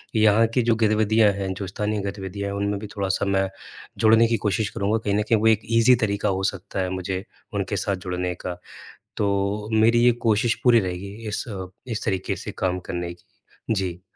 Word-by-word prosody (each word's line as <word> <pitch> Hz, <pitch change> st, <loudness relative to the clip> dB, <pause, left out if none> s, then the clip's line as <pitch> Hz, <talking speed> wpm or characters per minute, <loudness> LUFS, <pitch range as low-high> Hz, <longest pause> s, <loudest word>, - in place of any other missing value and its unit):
यहाँ 110 Hz, +1 st, +5 dB
की 125 Hz, -, +3 dB
जो 115 Hz, 0 st, +3 dB
गतिविधियाँ 110 Hz, -1 st, +3 dB
हैं, 95 Hz, -1 st, -3 dB
जो 95 Hz, +1 st, -5 dB
स्थानीय 105 Hz, +2 st, -2 dB
गतिविधियाँ 100 Hz, 0 st, -4 dB
हैं 100 Hz, -, -4 dB
उनमें 100 Hz, 0 st, -1 dB
भी 105 Hz, -, -7 dB
थोड़ा-सा 100 Hz, 0 st, 0 dB
मैं 95 Hz, -1 st, +1 dB, 0.5 s
जुड़ने 115 Hz, +1 st, +5 dB
की 115 Hz, 0 st, +1 dB
कोशिश 105 Hz, +1 st, 0 dB
करूँगा। 105 Hz, 0 st, 0 dB
कहीं 105 Hz, -2 st, -2 dB
न 105 Hz, -, +2 dB
कहीं 115 Hz, -2 st, +4 dB
वो 110 Hz, -, +3 dB
एक 110 Hz, -1 st, +4 dB, 0.2 s
ईजी 120 Hz, +2 st, +6 dB
तरीका 100 Hz, 0 st, -1 dB
हो 95 Hz, 0 st, -1 dB
सकता 100 Hz, +1 st, -7 dB
है 95 Hz, -1 st, 0 dB
मुझे 95 Hz, 0 st, -3 dB, 0.3 s
उनके 100 Hz, 0 st, -2 dB
साथ 100 Hz, +2 st, 0 dB
जुड़ने 90 Hz, 0 st, -2 dB
का। 90 Hz, -1 st, -3 dB, 0.6 s
तो 100 Hz, +1 st, 0 dB
मेरी 115 Hz, +2 st, +4 dB
ये 125 Hz, -, +7 dB, 0.2 s
कोशिश 110 Hz, +1 st, +3 dB
पूरी 120 Hz, -2 st, +6 dB
रहेगी 95 Hz, 0 st, -4 dB
इस 105 Hz, -, -2 dB
अ, 95 Hz, -4 st, -5 dB, 0.2 s
इस 115 Hz, -3 st, -3 dB
तरीके 95 Hz, -3 st, -1 dB
से -, -, -6 dB
काम 90 Hz, -1 st, 0 dB
करने 85 Hz, 0 st, -3 dB
की। 85 Hz, -, -23 dB, 0.5 s
जी। 90 Hz, -4 st, -2 dB
100 Hz, 200 wpm, -24 LUFS, 95-110 Hz, 0.6 s, ये